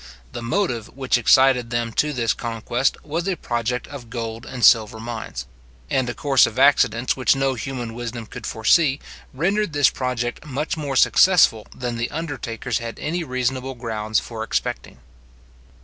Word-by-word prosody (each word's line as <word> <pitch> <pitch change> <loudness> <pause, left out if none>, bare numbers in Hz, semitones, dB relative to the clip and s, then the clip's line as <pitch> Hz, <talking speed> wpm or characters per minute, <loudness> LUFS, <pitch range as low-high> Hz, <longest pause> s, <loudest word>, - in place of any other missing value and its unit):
The - - -6
motive 120 - -1
which 130 -1 +1
excited 125 0 +4
them 120 -1 -1
to 150 +6 +1
this 115 -5 0
conquest 120 +2 -1
was 165 +4 -3
a 190 - 0
project 120 0 -2
of 130 -5 -10
gold 115 0 -5
and 125 -3 0
silver 110 -1 +5
mines; 110 - -6 0.5
and 130 -2 +1
a 120 - -4
course 135 +1 +4
of 110 - -8
accidents 130 -3 +3
which 130 +1 +3
no 135 0 +1
human 125 -2 -5
wisdom 120 -1 -6
could 110 +1 -8
foresee, 135 +6 +3 0.3
rendered 190 +6 0
this 145 -2 +4
project 125 -2 -3
much 150 +1 -3
more 145 -4 -4
successful 160 - +5
than 120 -1 -4
the 115 +1 -2
undertakers 130 -7 -4
had 115 -1 -6
any 170 +3 -2
reasonable 130 -1 -2
grounds 110 -3 -1
for 115 -2 -7
expecting. 110 - -3
125 Hz, 160 wpm, -22 LUFS, 115-135 Hz, 0.5 s, silver